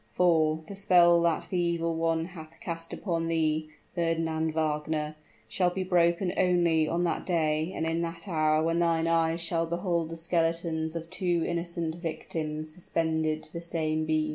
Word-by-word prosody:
For, 160 -3 +2
the 200 - -7
spell 175 -3 +5
that 170 -1 +1
the 180 - +1
evil 170 -1 0
one 165 0 0
hath 165 -2 -11
cast 165 -6 -6
upon 165 -4 -2
thee, 155 -1 0 0.2
Fernand 165 -2 0
Wagner, 155 -1 -1 0.3
shall 180 -2 +2
be 185 +1 -3
broken 175 0 +2
only 175 -4 +3
on 170 +2 0
that 170 -2 -1
day 160 -1 +1
and 160 - -1
in 165 +1 0
that 170 +2 -5
hour 155 -3 +2
when 165 +1 +1
thine 165 -1 +2
eyes 165 0 +2
shall 165 0 0
behold 170 -1 -1
the 165 - -6
skeletons 165 -1 -1
of 165 +1 -6
two 175 -3 0
innocent 170 -1 -2
victims 155 -2 -4
suspended 160 -2 -1
to 155 - -11
the 170 - -5
same 155 -2 -1
beam!" 155 -1 +1
165 Hz, 165 wpm, -28 LUFS, 160-170 Hz, 0.3 s, spell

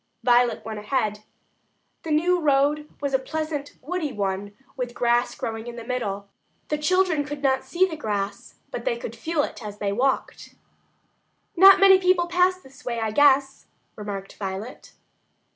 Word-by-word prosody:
Violet 245 -1 +3
went 220 -1 -5
ahead. 210 -1 -1 0.8
The 325 - -7
new 345 +4 +2
road 295 0 +2
was 280 -1 -2
a 265 - +3
pleasant 305 +1 -4
woody 315 0 -3
one, 200 -1 -3 0.2
with 250 -2 -4
grass 240 +1 +1
growing 225 +1 -5
in 240 - -7
the 235 - -7
middle. 205 -5 -3 0.4
The 300 - -1
children 360 -1 +2
could 295 0 -7
not 265 -1 +2
see 365 +2 +2
the 350 -4 -5
grass, 205 -7 -4 0.2
but - - -5
they - - -1
could 485 0 -7
feel 320 -3 -1
it 240 - -6
as 205 -1 -7
they 205 -1 -2
walked. 260 +4 -1 1.0
"Not 385 +2 +8
many 385 -1 +7
people 365 -1 +3
pass 365 +1 +2
this 275 -3 -17
way, 235 -2 -3
I 220 -1 -1
guess," 275 +1 +3 0.3
remarked 200 -2 -7
Violet. 195 +4 -6
270 Hz, 160 wpm, -24 LUFS, 220-320 Hz, 1.0 s, Not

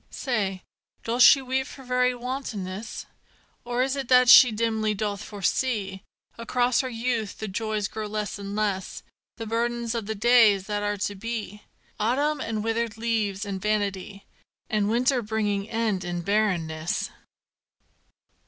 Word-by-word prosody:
Say, 200 -8 -2 0.4
doth 235 +2 -1
she 270 +2 +8
weep 260 +1 -1
for 270 - -11
very 250 0 +1
wantonness? 230 -6 -5 0.6
Or 245 +1 0
is 265 +1 -1
it 270 -2 -4
that 250 -1 +5
she 250 -1 +10
dimly 220 -1 0
doth 205 -1 -3
foresee 200 -1 -2 0.4
Across 245 +1 +1
her 260 - -4
youth 230 -3 -2
the 220 - -5
joys 215 +1 -2
grow 215 0 -5
less 210 -1 -4
and 200 0 -6
less 200 -3 -2 0.3
The 225 - -5
burden 235 +2 -1
of 230 -3 -4
the 220 - -3
days 215 -3 +5
that 205 0 -2
are 205 0 -1
to 205 +1 -2
be: 210 0 -5 0.4
Autumn 285 +7 +1
and 220 -2 -3
withered 225 0 -1
leaves 220 -3 -1
and 195 -2 -5
vanity, 200 -1 -2 0.5
And 210 -1 +1
winter 250 +3 +2
bringing 210 -2 -2
end 225 -5 -1
in 175 0 -4
barrenness. 175 -6 -1
220 Hz, 145 wpm, -25 LUFS, 200-240 Hz, 0.6 s, she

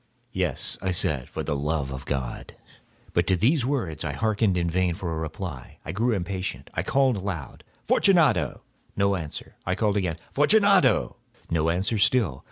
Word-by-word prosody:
"Yes," - - -2
I 95 - -1
said, 75 -7 0
"for - - -4
the 75 - -1
love 75 -1 -1
of 65 +1 -6
God!" 65 -4 -4 0.6
But 85 0 +2
to 95 - +3
these 125 - +2
words 100 - -2
I - - -2
hearkened 110 -4 +1
in 85 -1 0
vain 90 0 +1
for 85 -3 -4
a 80 - -3
reply. 80 -3 -6
I - - -3
grew 115 +6 +1
impatient. 95 0 -4
I - - -1
called 135 -4 +2
aloud— 95 -7 -5 0.2
"Fortunato!" 175 -5 +3 0.3
No 100 0 +2
answer. 80 -5 -7
I 95 - -1
called 105 -1 +1
again— 90 -5 -1 0.2
"Fortunato!" 185 - +4 0.3
No 80 -1 +2
answer 95 +6 0
still. 100 - +3
95 Hz, 170 wpm, -25 LUFS, 80-110 Hz, 0.6 s, Fortunato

